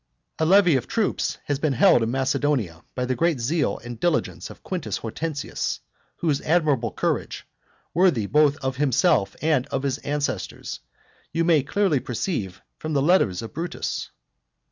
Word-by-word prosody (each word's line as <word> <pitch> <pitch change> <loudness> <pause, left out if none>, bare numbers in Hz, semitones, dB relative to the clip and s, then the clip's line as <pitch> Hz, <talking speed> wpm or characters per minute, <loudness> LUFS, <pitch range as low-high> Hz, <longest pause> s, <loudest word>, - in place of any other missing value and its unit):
A 160 - +2
levy 185 -3 +6
of 125 - -4
troops 220 -3 0
has 145 -2 -1
been 150 -2 +1
held 185 -6 +5
in 115 - 0
Macedonia, 130 - 0
by 125 - -1
the 130 - 0
great 165 0 +1
zeal 150 +7 0
and 120 -1 -7
diligence 170 +1 -1
of - - -13
Quintus 180 -4 -3
Hortensius; 145 +6 -3 0.4
whose 150 -5 0
admirable 150 - +1
courage, - - -2 0.5
worthy 170 - +3
both 145 +4 +3
of 130 0 -1
himself 135 - +2
and 150 -5 +2
of 135 - -3
his 140 -1 -1
ancestors, 145 -10 -3 0.5
you 165 +1 +1
may 165 -3 +4
clearly 155 +1 +1
perceive 115 - -3 0.2
from 155 0 -4
the 140 - +3
letters 145 - +3
of 110 - -8
Brutus. 170 +3 -4
145 Hz, 155 wpm, -24 LUFS, 125-165 Hz, 0.5 s, levy